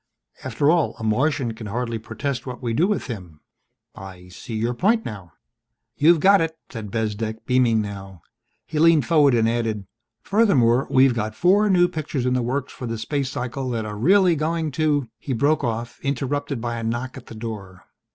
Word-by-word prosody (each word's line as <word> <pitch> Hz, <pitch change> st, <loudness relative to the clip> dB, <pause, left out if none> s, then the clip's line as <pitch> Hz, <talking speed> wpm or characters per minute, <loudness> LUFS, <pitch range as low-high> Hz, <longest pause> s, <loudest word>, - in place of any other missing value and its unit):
"After 135 Hz, +4 st, +1 dB
all, 170 Hz, -3 st, +1 dB
a -, -, -8 dB
Martian 125 Hz, +2 st, 0 dB
can 110 Hz, -1 st, -8 dB
hardly 115 Hz, +1 st, -3 dB
protest 125 Hz, +4 st, -4 dB
what 125 Hz, -1 st, -6 dB
we 120 Hz, -2 st, -3 dB
do 165 Hz, +10 st, +2 dB
with 210 Hz, -2 st, -1 dB
him. 90 Hz, -, -8 dB, 0.5 s
I 90 Hz, -1 st, -11 dB
see 110 Hz, +5 st, -8 dB
your 115 Hz, +3 st, -1 dB
point 220 Hz, -, +1 dB
now." 95 Hz, -6 st, -8 dB, 0.6 s
"You've 165 Hz, +2 st, +5 dB
got 195 Hz, +3 st, +5 dB
it," 160 Hz, 0 st, -2 dB
said 110 Hz, -4 st, -6 dB
Bezdek, 110 Hz, 0 st, -3 dB
beaming 120 Hz, -4 st, +2 dB
now. 95 Hz, -4 st, -9 dB, 0.4 s
He 155 Hz, -, -3 dB
leaned 165 Hz, -2 st, +5 dB
forward 150 Hz, -6 st, +4 dB
and 115 Hz, -1 st, +3 dB
added, 115 Hz, -3 st, -1 dB, 0.4 s
"Furthermore, 135 Hz, -, +3 dB
we've 130 Hz, -1 st, +5 dB
got 110 Hz, -1 st, -3 dB
four 200 Hz, -, +3 dB
new 175 Hz, -2 st, +5 dB
pictures 155 Hz, -6 st, -3 dB
in 125 Hz, -, +1 dB
the 125 Hz, -, +1 dB
works 130 Hz, +3 st, -3 dB
for 125 Hz, -, -6 dB
the 115 Hz, 0 st, -3 dB
space 135 Hz, +4 st, -2 dB
cycle 130 Hz, +1 st, -4 dB
that 115 Hz, -3 st, -2 dB
are 105 Hz, -1 st, -5 dB
really 180 Hz, -, +4 dB
going 160 Hz, +1 st, -1 dB
to 145 Hz, -2 st, 0 dB
" -, -, -64 dB
He 135 Hz, -, -4 dB
broke 145 Hz, +5 st, +1 dB
off, 115 Hz, -1 st, -3 dB
interrupted 140 Hz, 0 st, -2 dB
by 120 Hz, 0 st, -3 dB
a 115 Hz, -, -5 dB
knock 120 Hz, +3 st, -3 dB
at 130 Hz, -, -11 dB
the 115 Hz, -, -10 dB
door. 105 Hz, -5 st, -8 dB
125 Hz, 190 wpm, -23 LUFS, 110-150 Hz, 0.6 s, You've